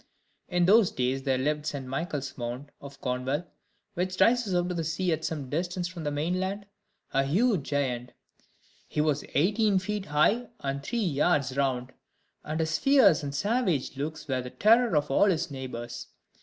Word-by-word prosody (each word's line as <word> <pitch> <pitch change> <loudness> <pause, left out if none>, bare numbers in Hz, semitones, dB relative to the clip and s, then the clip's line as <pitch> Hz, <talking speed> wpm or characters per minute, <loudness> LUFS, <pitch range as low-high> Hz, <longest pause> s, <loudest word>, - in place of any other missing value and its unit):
In 175 -1 +2
those 205 +1 +6
days 130 +1 -1
there 135 -1 +1
lived 150 +3 0
on - - -14
St. 140 -3 -3
Michael's 140 0 -4
Mount, 125 +3 -5
of 140 0 -11
Cornwall, 130 +4 -1 0.5
which 185 +1 -2
rises 230 -5 +3
out 175 0 +1
of 175 - -3
the 165 - -1
sea 165 +3 -1
at 160 0 -3
some 150 -5 -3
distance 175 +5 -2
from 175 -3 -8
the - - +1
mainland, 185 +7 -2 0.5
a 135 - +3
huge 190 - +2
giant. 125 -4 -1 0.7
He - - -4
was 150 -1 +1
eighteen 205 +5 +3
feet 205 +1 -3
high, 200 +12 +2
and 140 -4 -3
three 240 +12 -4
yards 150 - +1
round; 130 -2 -1 0.5
and 155 +1 -3
his 160 0 0
fierce 260 - +5
and 140 -1 -5
savage 190 - 0
looks 150 +2 -5
were 130 -2 0
the 125 - -7
terror 225 - +4
of 150 -1 0
all 140 - +5
his 170 -6 0
neighbors. 120 -3 -6
155 Hz, 175 wpm, -28 LUFS, 135-185 Hz, 0.7 s, those